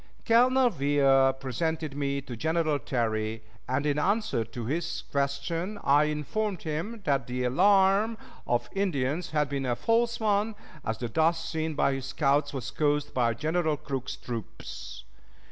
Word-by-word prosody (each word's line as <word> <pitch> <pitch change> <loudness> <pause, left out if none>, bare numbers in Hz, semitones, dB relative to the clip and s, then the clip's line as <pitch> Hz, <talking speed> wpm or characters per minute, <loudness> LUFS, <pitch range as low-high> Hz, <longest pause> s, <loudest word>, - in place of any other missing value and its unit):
Colonel 250 +2 +5
Weir 135 -3 +4
presented 145 +3 -3
me 140 -1 -1
to 125 -3 -7
General 160 +2 0
Terry, 110 -3 -2 0.3
and 130 +3 0
in 145 0 +1
answer 205 - +1
to 115 +1 -7
his 160 +7 -2
question 145 +8 -1
I 145 +2 +5
informed 175 +7 -2
him 170 +9 -4
that 140 -2 +1
the 125 0 -2
alarm 195 - +4 0.3
of 120 0 +1
Indians 165 -4 -1
had 150 -2 +1
been 135 -1 -2
a 120 - +1
false 235 - +1
one, 215 0 +1 0.3
as 110 0 -2
the 120 - -3
dust 160 +6 +1
seen 160 -1 -2
by 140 - +2
his 135 -1 -4
scouts 145 +1 +1
was 130 -4 -5
caused 145 -1 0
by 120 -3 +1
General 155 +3 0
Crook's 135 -3 -4
troops. 115 -3 -7
150 Hz, 150 wpm, -28 LUFS, 135-175 Hz, 0.3 s, Colonel